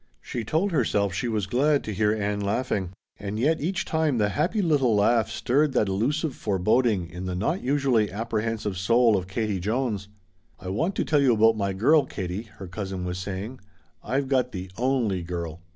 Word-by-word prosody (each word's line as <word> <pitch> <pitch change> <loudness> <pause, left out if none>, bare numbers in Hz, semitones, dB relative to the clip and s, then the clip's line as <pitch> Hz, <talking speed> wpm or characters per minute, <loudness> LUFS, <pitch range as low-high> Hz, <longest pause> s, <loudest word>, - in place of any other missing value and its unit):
She 120 - -5
told 160 - 0
herself 100 - +1
she 110 +7 -2
was 110 -4 -1
glad 140 +7 +2
to 110 - -4
hear 105 +1 +2
Ann 105 -1 -1
laughing; 100 -2 -1 0.3
and 100 +1 -5
yet 155 +6 +2
each 175 +3 -1
time 160 -5 +1
the 105 -2 +2
happy 170 - 0
little 145 - +3
laugh 110 +2 +3
stirred 140 +3 +1
that 110 -5 +2
elusive 135 - 0
foreboding 105 0 +1
in 90 +2 -7
the 90 - -2
not 155 - -1
usually 130 -5 +2
apprehensive 110 -2 -2
soul 115 +3 +4
of 90 -2 -2
Katie 105 0 -2
Jones. 105 0 -1 0.5
"I 90 - -7
want 160 - -1
to - - 0
tell 150 -2 +3
you 130 -4 +4
about 110 +1 +5
my 100 -2 -1
girl, 140 +9 +4
Katie," 95 +4 -5
her 95 - -8
cousin 95 -1 -5
was 90 0 -3
saying. 100 +6 -5 0.4
"I've 135 +4 -1
got 130 -2 +1
the 90 -1 -6
only 120 -7 0
girl." 85 -1 -5
110 Hz, 185 wpm, -25 LUFS, 95-130 Hz, 0.5 s, about